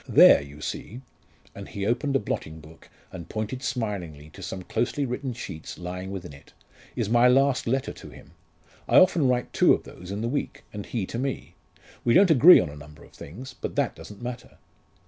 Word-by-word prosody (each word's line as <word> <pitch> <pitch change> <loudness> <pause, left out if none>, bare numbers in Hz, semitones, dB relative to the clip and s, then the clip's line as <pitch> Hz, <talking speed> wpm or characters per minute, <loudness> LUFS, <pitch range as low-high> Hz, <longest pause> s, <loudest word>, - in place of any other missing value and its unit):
There, - - +8
you 70 +1 -12
see 120 +10 -6 0.3
" - - -31
and - - -8
he 100 -1 -4
opened 130 +5 0
a - - +4
blotting 80 -6 -5
book 80 +2 -16 0.2
and 85 -2 -9
pointed 110 +4 -4
smiling 95 - -4
to 95 - -13
some 95 0 -6
closely 140 +8 -1
written 130 +1 -3
sheets 95 -9 -8
lying 90 +1 -6
within 95 -5 -7
it 70 - -17 0.4
"is - - -1
my 120 +3 +5
last 135 0 +3
letter 130 +3 -1
to - - -12
him. - - -15 0.6
I - - +5
often 170 -6 +5
write 125 -1 0
two - - +5
of - - -9
those 90 - -12
in 100 +2 -4
the 115 - -1
week, 140 +4 -3
and 105 -1 -7
he 110 -6 -2
to 115 - -5
me. 135 0 -4 0.5
We 120 - +3
don't 185 -2 +6
agree 160 +5 +9
on 90 - -1
a 75 - -10
number 75 +1 -13
of - - -18
things, 125 - -10
but - - -6
that - - 0
doesn't 105 +2 -12
matter." 125 0 -7
110 Hz, 205 wpm, -26 LUFS, 90-125 Hz, 0.6 s, agree